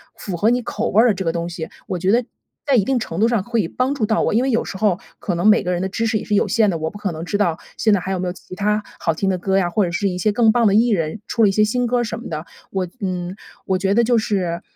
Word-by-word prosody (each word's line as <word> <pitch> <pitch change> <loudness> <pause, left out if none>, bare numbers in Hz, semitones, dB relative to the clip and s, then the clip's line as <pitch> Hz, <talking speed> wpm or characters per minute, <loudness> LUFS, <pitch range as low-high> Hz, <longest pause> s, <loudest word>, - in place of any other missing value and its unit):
符 190 - -5
合 210 +6 +3
你 245 +1 +1
口 230 -1 -3
味 215 - +5
儿 245 - +5
的 225 - +4
这 190 - -3
个 165 - +2
东 170 +1 -3
西， 165 -2 -5 0.2
我 185 - -2
觉 185 +3 +1
得， 240 +3 +3 0.4
在 280 -2 +2
一 220 - +4
定 265 +3 +1
程 170 -6 -5
度 220 - +4
上 235 -4 +1
会 230 -5 0
帮 255 +9 -1
助 235 -6 0
到 220 +1 +1
我。 - - +1
因 235 - +3
为 265 - +1
有 230 - +1
时 190 - -6
候， 195 -3 +1 0.2
可 185 - -3
能 175 +4 +1
每 215 +1 +5
个 180 - -1
人 175 -1 -1
的 190 - -1
知 230 +4 -2
识 220 -1 +1
也 - - -7
是 210 - 0
有 - - +2
限 220 -2 +3
的， 170 - -1
我 160 0 -3
不 205 - -10
可 200 -3 -2
能 160 +1 -6
知 205 +3 -2
道， 170 -6 +1 0.2
现 220 - +2
在 200 - +4
还 185 +2 -4
有 190 - -1
没 180 - -2
有 175 - -2
其 185 - -13
它 210 +2 0 0.2
好 165 - +1
听 195 - -1
的 185 -1 0
歌 190 +2 +1
呀， 190 -2 +2
或 205 +4 +2
者 175 - -1
是 200 +3 0
一 185 - -2
些 210 +4 +2
更 225 +1 +4
棒 235 -1 +3
的 200 - +3
艺 235 +3 +4
人 170 -2 -1
出 230 - -1
了 210 - +6
一 - - +2
些 215 +2 +3
新 245 +3 +1
歌 245 +1 +1
儿 240 - +1
什 225 0 -4
么 240 - -8
的。 155 0 -5 0.2
我 190 -2 -2
嗯， 180 -1 -3 0.3
我 190 -2 0
觉 195 +1 +1
得 235 - +4
就 240 +1 +2
是， 180 -5 -1
205 Hz, 360 characters per minute, -20 LUFS, 180-225 Hz, 0.4 s, 了